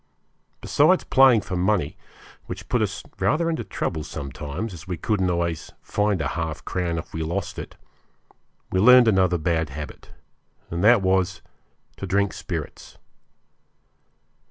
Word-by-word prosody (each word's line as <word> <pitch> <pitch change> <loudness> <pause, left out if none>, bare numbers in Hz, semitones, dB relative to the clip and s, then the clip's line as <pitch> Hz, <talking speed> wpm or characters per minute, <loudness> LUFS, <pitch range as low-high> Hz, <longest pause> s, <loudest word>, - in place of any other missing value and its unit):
Besides - - +3
playing 130 -4 +5
for 95 -1 -5
money, 90 -4 +1 0.5
which - - -7
put 120 -2 +1
us 100 -2 -2 0.2
rather 165 +2 +1
into 160 - -2
trouble 80 - -3
sometimes, 75 - -5
as 85 +2 -11
we 90 -2 -3
couldn't 95 0 0
always 85 -2 -2
find 105 -2 0
a 65 - -1
half 80 -2 -4
crown 85 -2 -2
if 80 - -7
we 80 - -3
lost 85 +4 -3
it, - - -8 1.0
we 95 - +1
learned 125 +3 +8
another 95 -4 +3
bad 80 -1 0
habit, 75 +2 -8 0.6
and 85 +2 -2
that 110 -2 +6
was 95 0 +1 0.5
to 100 - -5
drink 100 +1 +1
spirits. - - -6
90 Hz, 140 wpm, -24 LUFS, 80-105 Hz, 1.0 s, learned